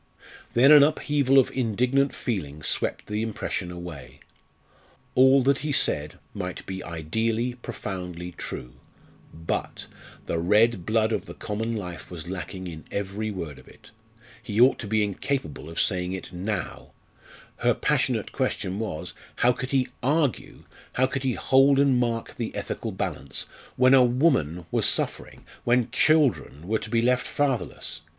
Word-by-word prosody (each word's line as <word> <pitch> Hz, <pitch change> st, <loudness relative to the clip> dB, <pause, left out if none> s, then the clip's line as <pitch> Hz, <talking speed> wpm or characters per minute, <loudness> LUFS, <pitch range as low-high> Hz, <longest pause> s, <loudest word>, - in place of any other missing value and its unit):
Then 130 Hz, +5 st, +7 dB
an 150 Hz, -1 st, +10 dB
upheaval 145 Hz, -2 st, +3 dB
of 135 Hz, -, +5 dB
indignant 125 Hz, +3 st, +1 dB
feeling 75 Hz, -, -4 dB
swept -, -, -1 dB
the 105 Hz, +1 st, -2 dB
impression 105 Hz, -4 st, -3 dB
away. 75 Hz, -7 st, -9 dB, 0.9 s
All 130 Hz, +1 st, +6 dB
that 140 Hz, +1 st, +3 dB
he 150 Hz, +1 st, -3 dB
said 75 Hz, -, +1 dB, 0.2 s
might 90 Hz, -2 st, -5 dB
be 95 Hz, 0 st, -5 dB
ideally, 110 Hz, +9 st, -1 dB
profoundly 90 Hz, -7 st, -6 dB
true 60 Hz, -6 st, -7 dB, 0.6 s
but 80 Hz, +1 st, -4 dB, 0.4 s
the 85 Hz, -, -1 dB
red 105 Hz, +2 st, +3 dB
blood 110 Hz, 0 st, +2 dB
of 110 Hz, -, -1 dB
the -, -, -8 dB
common 110 Hz, +2 st, -3 dB
life 90 Hz, -5 st, -6 dB
was 85 Hz, -2 st, -8 dB
lacking 95 Hz, +1 st, -6 dB
in 80 Hz, -3 st, -7 dB
every 100 Hz, +2 st, -3 dB
word 85 Hz, -8 st, -6 dB
of -, -, -18 dB
it! -, -, -17 dB, 0.5 s
He 110 Hz, -2 st, -3 dB
ought 125 Hz, +3 st, +6 dB
to 105 Hz, -, -5 dB
be 110 Hz, 0 st, +2 dB
incapable 100 Hz, -, -3 dB
of 80 Hz, -, -4 dB
saying 90 Hz, -2 st, 0 dB
it 95 Hz, -1 st, -7 dB
now. 100 Hz, +4 st, -4 dB, 0.6 s
Her -, -, +2 dB
passionate -, -, 0 dB
question 95 Hz, +2 st, -2 dB
was, 105 Hz, -9 st, -4 dB, 0.2 s
how 125 Hz, -, +4 dB
could 130 Hz, +1 st, -4 dB
he 130 Hz, -2 st, +1 dB
argue 145 Hz, -1 st, 0 dB, 0.3 s
how 130 Hz, -, +3 dB
could 135 Hz, +1 st, -3 dB
he 130 Hz, -2 st, 0 dB
hold 135 Hz, +3 st, +4 dB
and 140 Hz, -2 st, +4 dB
mark 115 Hz, -2 st, -2 dB
the 115 Hz, -, -4 dB
ethical -, -, -4 dB
balance 65 Hz, -1 st, -4 dB, 0.3 s
when 130 Hz, +1 st, +5 dB
a 130 Hz, -1 st, +8 dB
woman 120 Hz, -, +2 dB
was -, -, +3 dB
suffering, -, -, -1 dB, 0.2 s
when 120 Hz, -1 st, +2 dB
children 120 Hz, -, +2 dB
were 110 Hz, +1 st, +1 dB
to -, -, -7 dB
be 115 Hz, 0 st, +2 dB
left 125 Hz, +1 st, +2 dB
fatherless? 140 Hz, -4 st, -2 dB
110 Hz, 155 wpm, -26 LUFS, 90-130 Hz, 0.9 s, an